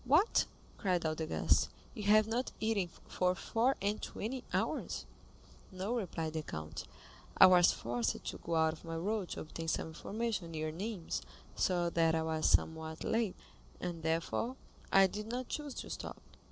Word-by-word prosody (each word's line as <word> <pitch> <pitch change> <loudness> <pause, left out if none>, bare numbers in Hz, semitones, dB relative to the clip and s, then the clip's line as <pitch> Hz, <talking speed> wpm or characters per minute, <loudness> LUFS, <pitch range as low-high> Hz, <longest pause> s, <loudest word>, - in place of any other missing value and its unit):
"What," 305 - +4 0.3
cried 180 -5 +1
all 160 - +2
the 155 0 -3
guests, 80 -4 +3 0.2
"you - - -6
have 215 +1 +6
not 235 +4 -1
eaten 215 -5 +1 0.2
for 180 0 +1
four 235 +7 +1
and 205 +1 0
twenty 250 +4 -4
hours?" - - -1 0.7
"No," 190 +4 -2
replied 165 -8 -2
the 160 - -1
count; 80 - -6 0.5
"I - - +11
was 180 -2 +7
forced 120 0 -2
to - - -3
go 170 - -2
out 160 0 +4
of 155 - -13
my 165 -1 -4
road 195 +3 -1
to - - -4
obtain 165 +1 -6
some 160 - 0
information 205 +2 -3
near 155 0 -2
Nîmes, 185 +1 -3 0.3
so 175 -2 +2
that 165 -1 +3
I 160 - +1
was 160 -1 +1
somewhat 160 0 +1
late, 225 -4 +1 0.4
and 175 -2 -4
therefore 165 +10 0 0.4
I 195 0 +8
did 210 +3 -3
not 245 +2 -3
choose 295 -3 -4
to - - -6
stop." - - -5
180 Hz, 170 wpm, -34 LUFS, 160-220 Hz, 0.7 s, I